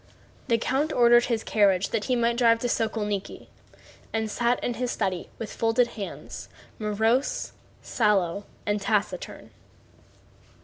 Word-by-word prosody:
The 230 -3 +3
count 270 +6 0
ordered 240 -1 +5
his 230 -2 -1
carriage 200 -3 +2
that 220 -2 -1
he 255 - +1
might 235 0 +1
drive 230 -2 +5
to 245 - 0
Sokólniki, 210 -4 -2 0.7
and 220 -1 -2
sat 240 +2 +1
in 245 - 0
his 250 +1 -2
study 185 -6 -2
with 225 - -6
folded 230 +2 +2
hands, 210 -4 -7 0.3
morose, 220 +5 0 0.3
sallow, 200 -4 +1 0.2
and 205 0 0
taciturn. 210 - -2
225 Hz, 130 wpm, -26 LUFS, 210-240 Hz, 0.7 s, ordered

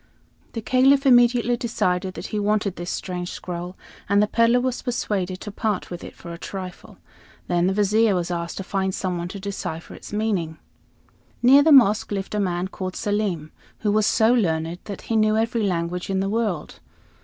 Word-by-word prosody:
The 225 - -5
Caliph 270 +3 +4
immediately 245 -1 +5
decided 190 -6 -1
that - - -6
he 210 - 0
wanted 205 -2 0
this 175 +1 -6
strange 180 -1 -4
scroll, 180 0 -6 0.3
and 200 0 +4
the 210 - +5
peddler 230 +3 +3
was 255 0 -2
persuaded 195 -7 -2
to 210 - -6
part 210 -2 -2
with 175 - -6
it - - -10
for 170 -1 -9
a 170 - -9
trifle. 185 -2 -8 0.5
Then 175 0 +1
the 190 - +1
Vizier 210 +1 +3
was 175 0 -2
asked 170 -1 -4
to 195 - -4
find 190 0 -1
some 180 -2 -2
one 170 - -3
to 195 +3 -7
decipher 190 -4 -5
its - - -11
meaning. 200 -7 -1 0.9
Near 270 +4 +8
the 310 +2 +4
mosque 220 -8 +5
lived 195 0 -3
a 210 - 0
man 180 -1 -1
called 185 -2 -5
Selim, 205 -7 -2 0.3
who 210 - +1
was 215 0 +3
so 225 +1 +4
learned 165 -6 0
that 200 -2 -7
he 225 - -2
knew 215 0 +3
every 225 +1 0
language 180 -2 -2
in 190 -1 0
the 195 +1 -1
world. 210 -7 -2
200 Hz, 190 wpm, -23 LUFS, 180-220 Hz, 0.9 s, Near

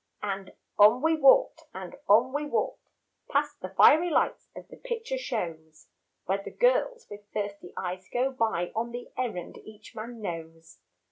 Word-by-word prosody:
And 195 -2 -4 0.3
on 215 +6 +7
we 320 0 +4
walked 305 +2 +5
and 185 -2 -7
on 235 +6 +5
we 295 +1 -1
walked - - -2 0.4
Past 290 +1 0
the 185 - -5
fiery 310 - +6
lights 315 - 0
of - - -10
the - - -11
picture 475 0 -4
shows 165 - -5 0.4
Where 195 +2 0
the - - -6
girls - - +1
with 205 0 -10
thirsty 200 -3 -4
eyes 185 +1 -5
go 255 +2 +1
by 220 -9 -1
On 230 +2 -2
the 245 +1 -7
errand 220 -9 -4
each 215 0 -14
man 230 +2 -7
knows. 165 -4 -7
220 Hz, 160 wpm, -28 LUFS, 185-290 Hz, 0.4 s, on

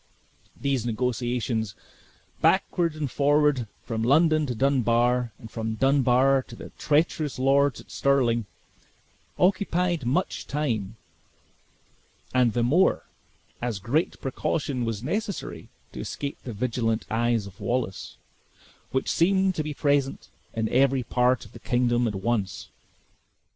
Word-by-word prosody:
These 140 -3 0
negotiations 120 -2 -1 0.7
backward 170 -3 +2
and 150 -4 -3
forward 145 -4 +2 0.2
from 110 -1 -3
London 155 +5 +3
to 125 - -3
Dunbar, 125 -2 +2
and 110 - -12
from 110 -1 -3
Dunbar 135 +1 +3
to - - -10
the - - -10
treacherous 150 -1 +1
lords 140 +1 +3
at - - -18
Stirling, 120 -5 +1 0.9
occupied 180 - +1
much 150 +9 -1
time; 115 -9 -2 1.4
and 125 -3 +3
the 120 - +1
more, 155 +11 +3 0.6
as 120 -3 -2
great 125 - -1
precaution 135 -1 -2
was 115 -1 -3
necessary 200 - -4 0.2
to - - -8
escape 140 -1 -5
the 120 - -5
vigilant 115 0 -1
eyes 115 -1 +1
of 100 -1 -12
Wallace, 120 -6 -3 0.7
which 130 - -1
seemed 190 +2 +3
to 160 - -2
be 150 -1 -5
present 140 -2 0 0.3
in 110 -1 0
every 135 0 +3
part 125 +1 +1
of - - -15
the - - -12
kingdom 120 -1 +1
at 105 - -3
once. 95 -2 -2
125 Hz, 125 wpm, -26 LUFS, 115-145 Hz, 1.4 s, London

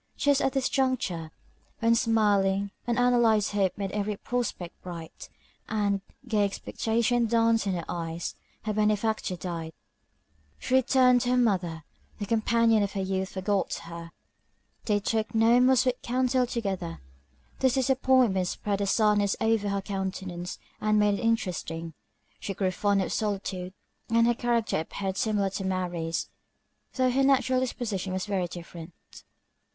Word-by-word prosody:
Just 285 -1 +3
at 270 - +1
this 265 -1 +1
juncture, 250 - -1 0.5
when 230 0 +3
smiling, 200 -4 +2 0.2
unanalyzed 240 -3 +3
hope 195 -3 0
made 195 -2 -3
every 205 0 -2
prospect 230 -9 -4
bright, 170 -3 -9 0.4
and 200 -2 0 0.3
gay 215 -3 +2
expectation 230 +3 0
danced 230 -1 +2
in 195 - +1
her 170 -2 -3
eyes, 165 -1 -4 0.3
her 215 -1 -2
benefactor 215 -2 0
died. 165 -2 -5 0.8
She - - -4
returned 255 -1 +5
to 245 - -1
her 250 - +3
mother 180 -9 +1 0.3
the 205 - -4
companion 230 +1 +3
of 200 -1 -1
her 195 - -2
youth 190 0 -2
forgot 195 +1 -1
her, 170 0 -9 0.7
they 210 -2 +2
took 220 +2 -1
no 225 +2 +5
more 255 +1 +5
sweet 255 0 +1
counsel 255 0 +1
together. 195 - -3 0.6
This 260 -1 +3
disappointment 260 -7 +3
spread 200 +2 -2
a 200 - 0
sadness 205 -1 +3
over 220 -2 +1
her 200 -1 -1
countenance, 190 -2 -4 0.2
and 215 0 +2
made 210 -1 +3
it - - -5
interesting. 170 -7 -1 0.5
She 195 - -5
grew 190 -1 0
fond 200 +1 +1
of - - -3
solitude, 195 -3 -3 0.3
and 230 +1 +4
her 240 - +4
character 235 -5 0
appeared 190 +4 -4
similar 205 -3 +1
to 195 - -4
Mary's, 175 -3 -2 0.7
though 255 -1 +2
her 265 +2 +2
natural 260 -2 +3
disposition 215 -7 -3
was 185 +1 -2
very 195 -4 -1
different. 170 -1 -10
210 Hz, 145 wpm, -27 LUFS, 190-235 Hz, 0.8 s, returned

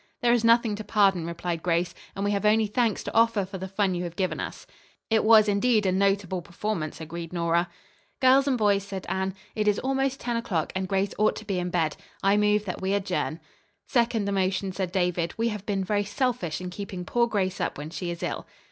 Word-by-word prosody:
"There 240 0 +5
is 240 -2 +2
nothing 230 -2 +4
to 215 - -5
pardon," 195 -5 +2
replied 170 0 -3
Grace, 175 0 0 0.2
"and 195 - -2
we 205 - +1
have 200 0 -1
only 215 +1 +4
thanks 225 0 0
to - - -5
offer 230 -3 +3
for 190 0 -7
the 190 - -4
fun 195 0 0
you 175 0 -2
have 170 0 -6
given 185 -1 -1
us." - - -6 0.5
"It 220 - +4
was 220 -1 +7
indeed 210 +1 +2
a 185 - +3
notable 195 -1 +1
performance," 175 -3 -4
agreed 165 +1 -6
Nora. 170 0 +1 0.5
"Girls 270 +1 +5
and 265 -3 +2
boys," 205 -3 +3
said 195 -1 -6
Anne, 190 0 -2 0.2
"it 215 -1 -1
is 210 - +3
almost 270 0 0
ten 240 -1 -2
o'clock 180 -9 -2
and 190 0 -1
Grace 195 +1 0
ought 215 - +3
to 220 - -8
be 195 -3 -1
in 180 0 -2
bed. 165 -4 0 0.3
I 195 +1 +4
move 210 0 +2
that 185 - -5
we 190 +1 +1
adjourn." 185 -4 -2 0.5
"Second 235 -4 +1
the 200 - -1
motion," 190 0 0
said 185 -1 -3
David. 180 -2 0
"We 230 +1 +1
have 210 -2 -6
been 195 -2 0
very 205 +2 0
selfish 225 - -1
in 180 0 -6
keeping 185 -1 -6
poor 235 +4 +2
Grace 195 -4 -1
up - - -2
when 150 +2 -6
she 175 +1 -4
is 170 0 -5
ill." - - -3
195 Hz, 225 wpm, -26 LUFS, 180-215 Hz, 0.5 s, was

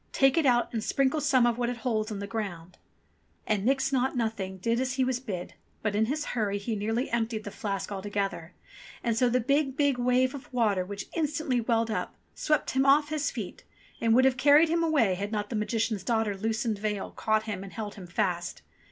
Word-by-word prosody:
Take 270 -1 +4
it 325 -4 +3
out 240 -1 +2
and 225 -2 -2
sprinkle 275 +3 +1
some 260 -4 +4
of 240 0 +1
what 240 -1 +1
it 245 - -3
holds 220 -2 0
on 210 - -3
the 200 - -4
ground." 190 -6 -5 0.7
And 210 -2 0
Nix 270 +3 +1
Naught 260 0 +1
Nothing 215 -5 -2
did 230 +5 0
as 255 0 -1
he 265 0 +1
was 255 -1 0
bid; 190 -9 -5 0.3
but 215 -1 0
in 215 +1 +3
his 295 +4 -2
hurry 210 -4 0
he 215 +3 -3
nearly 225 +5 -1
emptied 225 -2 -1
the 205 - -6
flask 200 -1 -4
altogether; 195 -3 -3 0.5
and 235 -2 +1
so 245 +2 +3
the 250 +1 +2
big, 275 +2 +1
big 285 -4 +2
wave 250 +1 +2
of 280 +1 -9
water 215 -7 +2
which 200 +2 -6
instantly 300 -5 0
welled 230 -1 +1
up, - - -3 0.2
swept 305 -1 0
him 265 0 +2
off 290 +2 +4
his 295 -2 0
feet, 215 -7 -7 0.4
and 230 -1 +4
would 260 +1 +5
have 260 -1 +3
carried 290 +5 +6
him 335 +1 +1
away, 295 - +3
had 200 +3 -4
not 210 0 -3
the - - -2
Magician's 215 -2 -1
daughter's 220 -4 0
loosened 220 -1 -1
veil 210 -1 -2
caught 215 0 0
him 205 -4 -5
and 195 - -10
held 210 -2 -5
him 190 -4 -10
fast. 180 -2 -2
230 Hz, 215 wpm, -28 LUFS, 205-260 Hz, 0.7 s, carried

